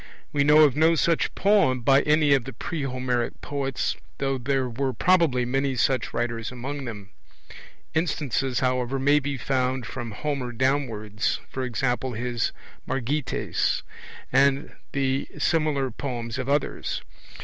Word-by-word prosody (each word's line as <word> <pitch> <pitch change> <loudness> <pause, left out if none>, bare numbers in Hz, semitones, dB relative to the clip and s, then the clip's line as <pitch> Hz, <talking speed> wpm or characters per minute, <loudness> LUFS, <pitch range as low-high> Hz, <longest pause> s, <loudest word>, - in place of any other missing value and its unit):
We 140 - +3
know 150 +2 +7
of 140 -4 +4
no 160 +2 +4
such 165 +2 +1
poem 195 -11 +3
by 135 +3 +5
any 150 -1 +4
of 135 -4 +2
the 135 - -7
pre 155 +7 -4
Homeric 125 -3 -1
poets, 135 -2 -2 0.2
though 135 -1 -1
there 135 +1 0
were 130 +2 -2
probably 155 -3 +3
many 135 +2 0
such 130 +1 +1
writers 120 -1 -2
among 135 +3 -5
them; 105 -4 -8 0.8
instances, 140 -6 0
however, 125 0 0
may 145 +2 +4
be 140 0 -3
found 130 0 0
from 120 +1 -5
Homer 140 -2 -3
downwards, 115 -5 0 0.2
e.g. 125 -3 -3 0.4
his 120 -1 -1 0.4
Margites, 135 +2 -1 0.5
and 140 +1 +3 0.2
the 135 0 0
similar 150 -5 +1
poems 120 -3 -4
of 130 +1 -3
others. 145 0 -1
135 Hz, 135 wpm, -25 LUFS, 125-145 Hz, 0.8 s, know